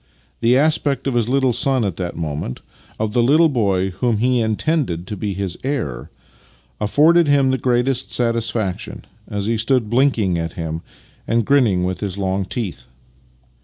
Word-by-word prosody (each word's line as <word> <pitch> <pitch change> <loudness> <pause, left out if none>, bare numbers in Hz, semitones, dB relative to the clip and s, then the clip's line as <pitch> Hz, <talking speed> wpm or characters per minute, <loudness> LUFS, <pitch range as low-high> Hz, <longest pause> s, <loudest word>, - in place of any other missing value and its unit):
The 120 +2 +3
aspect 145 -1 +1
of 135 - 0
his 120 -1 0
little 130 -1 +2
son 130 -1 +1
at 95 -4 -3
that 90 -2 -4
moment 75 -5 -4 0.2
— - - -28
of 110 -1 -1
the 120 - +3
little 155 +7 +4
boy 100 -7 0
whom 110 +4 0
he 125 +2 +2
intended 110 - -1
to 105 - -5
be 100 -1 -3
his 95 -2 -4
heir 120 - -3 0.4
— - - -31
afforded 155 +10 +4
him 140 -2 +3
the 130 - 0
greatest 125 +1 0
satisfaction 115 -3 -2 0.2
as 100 -2 -3
he 115 0 0
stood 115 -1 +1
bhnking 120 -8 +2
at 85 0 -4
him 80 -1 -4 0.5
and 115 -1 +1
grinning 115 -10 +3
with 90 0 -2
his 100 -2 -4
long 95 0 -1
teeth. 105 -2 -5
115 Hz, 170 wpm, -20 LUFS, 95-130 Hz, 0.5 s, little